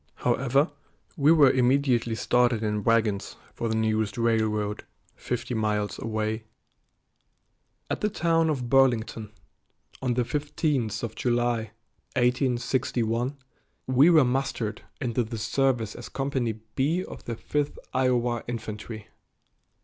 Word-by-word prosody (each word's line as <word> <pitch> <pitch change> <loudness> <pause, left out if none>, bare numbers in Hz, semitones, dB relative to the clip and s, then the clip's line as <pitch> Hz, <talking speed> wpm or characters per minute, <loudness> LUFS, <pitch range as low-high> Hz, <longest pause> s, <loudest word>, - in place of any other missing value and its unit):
However, 135 +4 +1 0.4
we 145 +2 +4
were 145 -5 +7
immediately 125 -2 +2
started 120 -1 +2
in 105 -1 -1
wagons 110 -3 +1 0.2
for 115 - -3
the 110 - 0
nearest 110 -2 0
railroad, 110 -2 0 0.3
fifty - - -4
miles 105 -2 -1
away. 110 0 -2 1.4
At - - -3
the 210 - +2
town 165 -4 +2
of 130 -5 -1
Burlington, 120 -4 +2 0.7
on 125 -2 0
the 125 - +2
15th 140 -5 -1
of 115 -2 -3
July, 120 -2 0 0.5
1861, 125 0 0 0.5
we 130 +5 +5
were 155 -5 +6
mustered 125 -4 -1 0.2
into 120 -1 0
the 115 +1 -6
service 120 -1 0
as 120 - -9
Company 135 -4 -1 0.2
B 160 +9 +1
of - - -10
the 115 - -3
Fifth 145 +5 -2 0.2
Iowa 125 -2 +1
Infantry. 110 -2 -6
120 Hz, 120 wpm, -26 LUFS, 110-135 Hz, 1.4 s, were